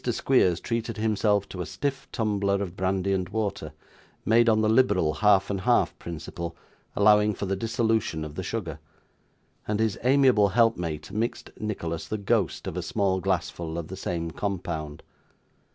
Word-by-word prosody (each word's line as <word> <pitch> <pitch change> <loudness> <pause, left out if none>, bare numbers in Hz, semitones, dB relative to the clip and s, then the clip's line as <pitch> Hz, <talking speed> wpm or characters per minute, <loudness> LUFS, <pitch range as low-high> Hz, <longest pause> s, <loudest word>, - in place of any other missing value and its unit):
Squeers 120 -7 +2
treated 115 -1 -3
himself 105 -2 +1
to 90 - -6
a - - -3
stiff 135 - -3
tumbler 100 -4 0
of 100 -3 -3
brandy 95 +1 0
and 95 -2 -1
water, 100 -7 -3 0.5
made 115 +1 +5
on 110 -1 +3
the 110 - +2
liberal 105 -9 +3
half 100 +3 +3
and 100 -2 -2
half 120 +4 +2
principle, 85 0 -6 0.4
allowing 105 0 +4
for - - -4
the 95 0 -1
dissolution 110 -6 0
of 75 - -8
the 95 - -4
sugar; 90 -5 -4 0.9
and 105 0 -1
his 110 -2 0
amiable 130 -5 +5
helpmate 90 -7 0
mixed 110 +4 -3
Nicholas 85 -6 -4
the 110 - -2
ghost 100 - 0
of - - -4
a - - -2
small 95 -2 0
glassful 85 -3 -2
of 85 -2 -5
the 95 - -6
same 85 -3 -3
compound. 80 -6 -4
100 Hz, 160 wpm, -26 LUFS, 90-110 Hz, 0.9 s, made